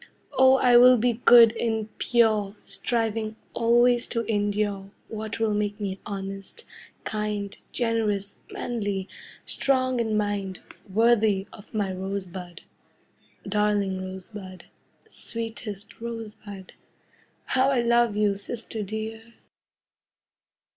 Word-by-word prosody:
Oh, 260 0 +6
I 250 -2 +5
will 250 +1 +8
be 240 0 0
good 235 -1 +8
and 220 -2 -2
pure, 215 -4 +2
Striving 220 +1 -1 0.2
always 240 +1 +3
to 230 - -1
endure 205 -2 -1 0.2
What 220 -1 -5
will 225 -2 +1
make 205 0 -1
me 195 -2 -3
honest, 195 - -7 0.4
kind, 210 -2 -3 0.2
Generous, 215 -4 -1
manly, 205 -5 -3 0.4
strong 255 -2 +1
in 220 -2 0
mind, 200 -3 -2 0.3
Worthy 220 -2 +3
of 205 - -14
my 205 -4 -1
Rosebud. 185 -2 -6 0.9
Darling 205 -2 +1
Rosebud, 185 0 -8 0.5
Sweetest 225 -3 -7
Rosebud, 215 -4 -8 0.7
How 260 +1 +2
I 260 -3 +2
love 235 -2 +3
you, 210 -1 +2
sister 220 +2 -6
dear! 220 +2 -6
215 Hz, 105 wpm, -26 LUFS, 200-230 Hz, 0.9 s, will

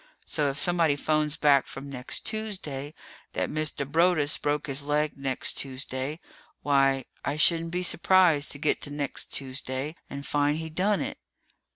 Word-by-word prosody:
So 150 -2 0
if 135 - -4
somebody 170 -4 +4
phones 150 +1 0
back 145 -2 +4
from 135 +1 -8
next 130 -2 -5
Tuesday 170 -10 -4 0.4
that - - -1
Mr. 155 -2 0
Broaddus 160 0 +3
broke 145 0 0
his 140 0 -1
leg 150 +1 +1
next 135 -2 -2
Tuesday 135 +2 -3 0.4
why, 135 -2 +3 0.2
I 140 - -1
shouldn't 165 +1 +2
be 180 +2 -2
surprised 175 -4 +4
to - - -6
get 150 +1 0
to - - -2
next 145 -1 -3
Tuesday 135 +2 -3
and 140 0 -6
find 145 +1 +1
he 160 0 -5
done 195 +5 +1
it. - - -4
145 Hz, 160 wpm, -27 LUFS, 140-160 Hz, 0.4 s, somebody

